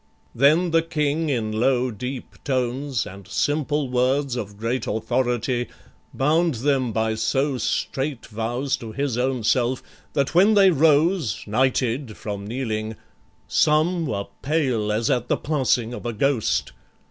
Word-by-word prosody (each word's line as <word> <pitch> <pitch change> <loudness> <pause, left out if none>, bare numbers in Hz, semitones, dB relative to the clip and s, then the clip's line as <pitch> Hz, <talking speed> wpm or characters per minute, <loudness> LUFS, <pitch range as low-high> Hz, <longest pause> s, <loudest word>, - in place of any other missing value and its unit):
Then 155 +7 +4
the 165 0 +4
King 155 -1 -1
in 115 -5 -1
low 125 +3 +1
deep 125 +4 -7
tones, 130 0 -1
And 95 0 -10
simple 145 +4 0
words 130 +2 +1
of 105 -4 -5
great 115 +4 -2
authority, 120 +2 0 0.4
Bound 155 +3 +2
them 130 0 +1
by 110 0 0
so 135 +4 0
strait 135 +3 -2
vows 120 +5 -2
to 115 -3 -8
his 140 -2 -1
own 125 -1 -1
self, 120 +3 +1 0.3
That 140 0 0
when 195 +5 +5
they 195 -2 +6
rose, 160 - +2
knighted 125 +1 0
from 100 -1 -5
kneeling, 110 -2 -3 0.5
some 160 +2 +2
Were 100 -4 -2 0.2
pale 130 -8 0
as 110 +2 +1
at 125 0 0
the - - +1
passing 130 -5 0
of 120 - -6
a 120 - -2
ghost. 125 +1 0
130 Hz, 140 wpm, -23 LUFS, 115-145 Hz, 0.5 s, they